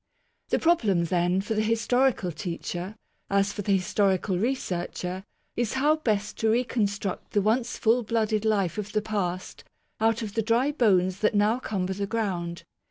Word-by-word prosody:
The - - +2
problem 215 - +2
then, 175 +2 +1
for 205 +3 -3
the 215 - +1
historical 230 -2 +1
teacher, 175 +5 -5 0.3
as 200 0 +2
for - - -4
the 200 0 +1
historical 190 0 +1
researcher, 185 -4 -2 0.3
is 240 -2 -1
how 295 +4 +3
best 215 -9 -1
to 225 - +2
reconstruct 210 -5 -1
the 205 - +3
once 230 +3 +1
full 235 +2 +3
blooded 220 -1 0
life 205 -4 +1
of 210 0 -5
the 215 - +2
past 185 -4 -3 0.4
out 225 +1 +2
of 205 -2 -5
the 225 - +1
dry 235 +6 +2
bones 190 -8 +2
that 215 0 +2
now 210 +4 +3
cumber 190 -6 -2
the 200 +1 -3
ground. 180 -6 -2
210 Hz, 165 wpm, -26 LUFS, 185-225 Hz, 0.4 s, how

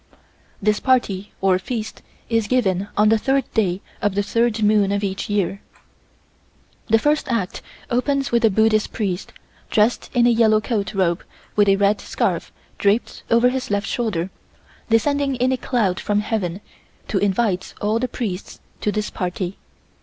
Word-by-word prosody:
This 210 +1 +1
party 210 -7 +1
or 190 -1 +3
feast 220 +2 -5 0.3
is 225 -2 +1
given 200 -6 +1
on 210 +1 +5
the 220 0 +4
third 270 +3 +1
day 195 -4 +1 0.2
of 205 -2 0
the 205 - +1
third 230 +1 +1
moon 210 -1 +4
of 200 0 -1
each 195 0 -3
year. 200 -1 0 1.3
The 225 - +5
first 295 +2 +1
act 210 -6 -2 0.3
opens 275 +3 0
with 235 0 +2
a 225 - +6
Buddhist 215 +1 +2
Priest, 195 -5 -3 0.4
dressed 220 +2 +2
in 240 -1 +5
a 240 - +5
yellow 220 -2 +4
coat 215 -3 -2
robe 175 -3 +1 0.3
with 205 -1 +4
a 195 - +5
red 200 +1 +2
scarf - - -1 0.3
draped 205 +3 +1
over 235 +2 +5
his 260 0 -3
left 205 0 0
shoulder, 195 -7 -2 0.6
descending 275 +4 +2
in 255 +1 +1
a - - +2
cloud 220 -8 0
from 205 0 0
Heaven 205 -4 -2 0.5
to 195 - 0
invite 195 -1 0
all 215 +2 +1
the 255 - 0
priests 210 -6 -5 0.2
to 210 - 0
this 210 0 -2
party. 180 0 -3
215 Hz, 160 wpm, -21 LUFS, 195-235 Hz, 1.3 s, a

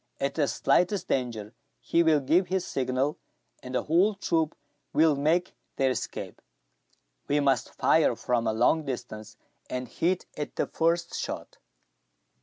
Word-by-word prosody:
At 140 0 -1
the 150 -3 +1
slightest 180 +7 +1
danger, 115 -4 -2 0.3
he 170 - +2
will 160 -3 +4
give 165 +7 +2
his 185 0 -1
signal, 130 +2 -1 0.4
and 125 0 -7
the - - +1
whole 185 +7 +3
troop 165 -5 0 0.4
will 155 -1 +4
make 160 +6 +1 0.2
their 135 -1 +2
escape. - - -5 0.9
We 145 +1 +2
must 135 -3 +1
fire - - +3
from 120 -2 -1
a - - +2
long 125 +8 +2
distance, 110 -5 -6 0.3
and 125 0 -3
hit 180 +2 -1
at 150 - -5
the - - 0
first 170 +1 0
shot." - - -6
145 Hz, 145 wpm, -27 LUFS, 125-170 Hz, 0.9 s, will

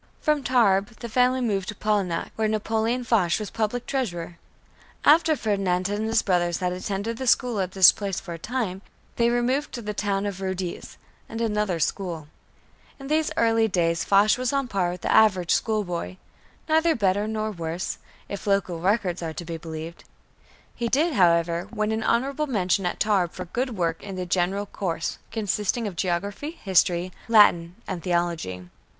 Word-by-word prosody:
From 300 -1 +1
Tarbes, 220 -4 +2
the 235 - -5
family 250 +2 +2
moved 200 -6 -1
to 215 - -5
Polignac, 200 -5 -1
where 220 0 0
Napoleon 220 +3 0
Foch 205 -8 +2
was 215 -2 -5
Public 225 +2 -2
Treasurer. 175 -10 -3 0.7
After 315 +1 +5
Ferdinand 195 -6 0
and 210 +2 -2
his 225 0 +2
brothers 175 -3 +1
had 180 -1 -1
attended 200 +4 -3
the 260 - -4
school 240 -2 +2
at 185 -1 -2
this 190 -2 +8
place 200 -3 -4
for 175 -3 -8
a 165 - -8
time, 215 -3 -3 0.4
they 235 0 +3
removed 245 +4 0
to 240 - -5
the 210 0 -3
town 200 -1 -1
of 195 -2 -4
Rodez 190 -2 -4 0.3
and 225 - -5
another 210 -6 0
school. 165 -2 -2 0.7
In 275 0 -8
these 310 0 +2
early 225 -1 +3
days 170 -4 +1
Foch 205 +4 +4
was 255 -1 0
on 275 -1 0
a - - -9
par 190 -6 0
with 175 0 -6
the - - -1
average 185 -6 +4
schoolboy, 190 -5 -1 0.5
neither 320 +1 +3
better 205 -1 +1
nor 215 0 -2
worse, 170 -1 -4 0.3
if 200 +1 -7
local 195 -4 +1
records 185 -2 0
are 165 -1 -4
to 170 - -7
be 165 0 -5
believed. 160 +1 -8 0.7
He 235 - -2
did, 300 +7 +2
however, 170 -3 +2
win 215 -1 -1
an 220 0 -1
honorable 275 +6 0
mention 190 -6 +1
at - - -4
Tarbes 195 -5 +1
for 185 - -5
good 240 +5 -3
work 165 -2 -1
in 195 -2 -7
the 185 -1 -3
general 185 +3 0
course, 170 -5 -3
consisting 210 +1 -1
of 200 -4 -4
geography, 200 - -3
history, 180 -2 +2 0.2
Latin, 180 -6 +5
and 175 - -4
theology. 170 - -2
200 Hz, 175 wpm, -25 LUFS, 180-230 Hz, 0.7 s, this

